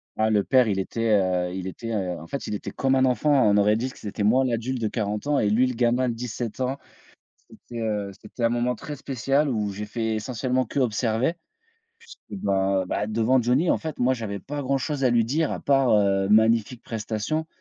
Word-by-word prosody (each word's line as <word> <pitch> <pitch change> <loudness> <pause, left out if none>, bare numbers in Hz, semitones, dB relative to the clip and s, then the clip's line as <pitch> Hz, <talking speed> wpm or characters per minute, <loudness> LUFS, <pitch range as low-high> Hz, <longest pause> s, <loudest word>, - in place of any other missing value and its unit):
Ah 110 0 +1
le 105 -2 +2
père, 130 0 +4
il 100 -3 0
était, 115 +4 -2
heu, 90 -1 0
il 95 -1 -5
était, 115 +5 -6
heu, 95 -5 -2
en 80 - -11
fait, 140 - -5
il - - -4
était 105 - -4
comme 135 -1 0
un 130 -1 +3
enfant. 130 +4 +1
On 115 -8 +4
aurait 105 +1 +4
dit 125 +4 -2
que - - -14
c'était 105 0 -6
moi 125 +6 +4
l'adulte 125 +1 -2
de 110 - 0
40 105 0 -3
ans 145 0 +2
et 105 - +2
lui 115 +5 +3
le 125 - -1
gamin 120 +1 +1
de 120 - -1
17 120 0 -5
ans. 130 +1 -1 0.7
C'était, 120 -1 -9
heu, 105 -3 -2
c'était 110 +3 -9
un 115 - +4
moment 120 +1 0
très 150 +3 -7
spécial 135 +2 0
où 105 -5 -1
j'ai 105 +2 -6
fait 110 0 -2
essentiellement 125 +3 -1
qu'observer. 120 +2 0 0.7
Puisque 200 - -11
bah 95 -1 +1
bah, 105 - -2
devant 115 +4 +2
Johnny 130 +9 +2
en - - +2
fait, 160 -2 -6
moi 130 +1 +2
j'avais 110 -4 -4
pas 145 +8 -5
grand-chose 135 +1 -1
à 130 - +4
lui 120 -2 +3
dire 150 +6 0
à - - -3
part, 135 -2 +2
heu, 95 -1 +2
magnifique 110 +2 +3
prestation 115 +7 -3
115 Hz, 220 wpm, -25 LUFS, 105-130 Hz, 0.7 s, père